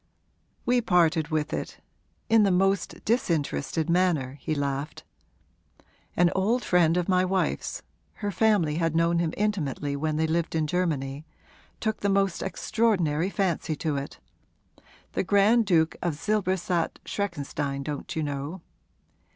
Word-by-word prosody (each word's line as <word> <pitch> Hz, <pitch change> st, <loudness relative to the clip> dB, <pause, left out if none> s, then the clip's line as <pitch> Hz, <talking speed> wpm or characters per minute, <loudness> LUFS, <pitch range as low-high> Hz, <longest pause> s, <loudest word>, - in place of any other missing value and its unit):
'We 245 Hz, 0 st, +3 dB
parted 170 Hz, -6 st, +3 dB
with 155 Hz, -2 st, -1 dB
it -, -, -4 dB, 0.5 s
in 225 Hz, -1 st, +5 dB
the 200 Hz, -, +4 dB
most 195 Hz, 0 st, 0 dB
disinterested 165 Hz, -, 0 dB
manner,' 165 Hz, -7 st, +1 dB
he 155 Hz, -, -2 dB
laughed. 140 Hz, +1 st, -3 dB, 1.1 s
'An 175 Hz, 0 st, +4 dB
old 220 Hz, +6 st, +1 dB
friend 175 Hz, -2 st, +3 dB
of 180 Hz, -, 0 dB
my 185 Hz, -1 st, +3 dB
wife's 185 Hz, 0 st, -1 dB, 0.3 s
her 205 Hz, -1 st, -4 dB
family 195 Hz, -7 st, +2 dB
had 165 Hz, -2 st, 0 dB
known 170 Hz, +1 st, +3 dB
him 170 Hz, -2 st, 0 dB
intimately 150 Hz, -9 st, -1 dB
when 155 Hz, +2 st, -1 dB
they 160 Hz, +1 st, +1 dB
lived 165 Hz, +1 st, -1 dB
in 160 Hz, -1 st, +1 dB
Germany 150 Hz, -5 st, -1 dB, 0.6 s
took 220 Hz, -2 st, -1 dB
the 200 Hz, -, 0 dB
most 195 Hz, -2 st, +1 dB
extraordinary 190 Hz, -6 st, 0 dB
fancy 180 Hz, -6 st, -1 dB
to 150 Hz, 0 st, -2 dB
it: 140 Hz, 0 st, -5 dB, 0.9 s
the -, -, -1 dB
Grand 205 Hz, +4 st, +4 dB
Duke 165 Hz, -3 st, +3 dB
of 170 Hz, -4 st, -1 dB
Silberstadt 185 Hz, -2 st, 0 dB
Schreckenstein, 145 Hz, -7 st, -3 dB
don't 145 Hz, -1 st, -5 dB
you 160 Hz, -, -1 dB
know? 145 Hz, +5 st, -4 dB
170 Hz, 135 wpm, -26 LUFS, 155-195 Hz, 1.1 s, in